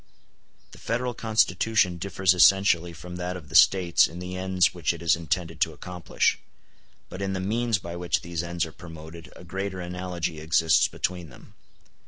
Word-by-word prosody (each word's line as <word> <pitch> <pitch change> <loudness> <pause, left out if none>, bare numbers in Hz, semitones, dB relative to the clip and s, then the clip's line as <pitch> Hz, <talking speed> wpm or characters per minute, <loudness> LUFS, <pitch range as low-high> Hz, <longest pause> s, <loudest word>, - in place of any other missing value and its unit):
The - - -14
Federal 120 +1 -2
Constitution 110 -4 +1
differs 95 0 +1
essentially 90 -2 +4
from 90 +2 -9
that 90 +1 -4
of 75 -5 -13
the - - -12
States 85 +1 +5
in 85 - -11
the 90 +1 -6
ends 95 -1 +1
which 85 -2 -1
it 85 - -11
is 85 +1 +4
intended 80 0 -3
to 80 -2 +2
accomplish, 90 +2 -1 0.7
but 95 - -8
in 95 0 -2
the 95 - -2
means 115 +3 0
by 85 -1 -8
which 85 0 -1
these 85 -1 -4
ends 85 -1 -2
are 80 - -10
promoted 80 0 -11
a - - -13
greater 95 +1 -5
analogy 90 -2 -4
exists 80 +1 +3
between 90 -3 -4
them. 100 - -16
90 Hz, 175 wpm, -25 LUFS, 85-95 Hz, 0.7 s, States